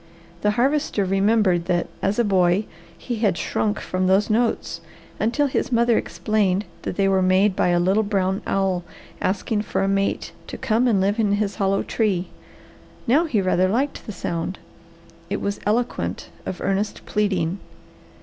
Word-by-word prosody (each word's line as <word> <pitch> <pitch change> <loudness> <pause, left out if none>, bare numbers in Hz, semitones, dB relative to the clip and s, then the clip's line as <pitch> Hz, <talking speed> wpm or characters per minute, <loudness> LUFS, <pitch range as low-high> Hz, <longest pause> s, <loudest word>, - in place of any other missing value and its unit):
The 210 - +2
Harvester 270 -5 +1
remembered 195 -2 +2
that 175 -1 +1 0.2
as 195 +2 0
a 240 - +3
boy 190 -1 +2 0.3
he 240 -2 -4
had 205 -5 +1
shrunk 210 0 -1
from 185 0 -1
those 195 +3 +3
notes 230 +1 0 0.4
until 235 +7 +1
his 260 - -1
mother 235 -1 +3
explained 210 -3 0 0.2
that - - -4
they 195 0 +2
were 190 -1 +3
made 185 +2 +3
by - - +2
a 175 0 +3
little 190 +5 +3
brown 195 -2 0
owl 190 -2 0 0.4
asking 205 +3 0
for 200 - -1
a - - +1
mate 195 0 0 0.2
to - - -6
come 230 +3 +1
and 215 -5 +3
live 200 +4 +1
in 205 -2 +2
his 205 -1 -1
hollow 195 0 +1
tree. 190 -6 0 0.8
Now 290 +8 +3
he 225 - 0
rather 185 0 +2
liked 265 +7 -1
the - - -4
sound. 175 -1 -3 0.7
It 200 - -1
was 200 0 -2
eloquent 235 +3 -1 0.2
of 180 - -5
earnest 195 +1 -1
pleading. 190 -4 0
200 Hz, 165 wpm, -23 LUFS, 185-220 Hz, 0.8 s, a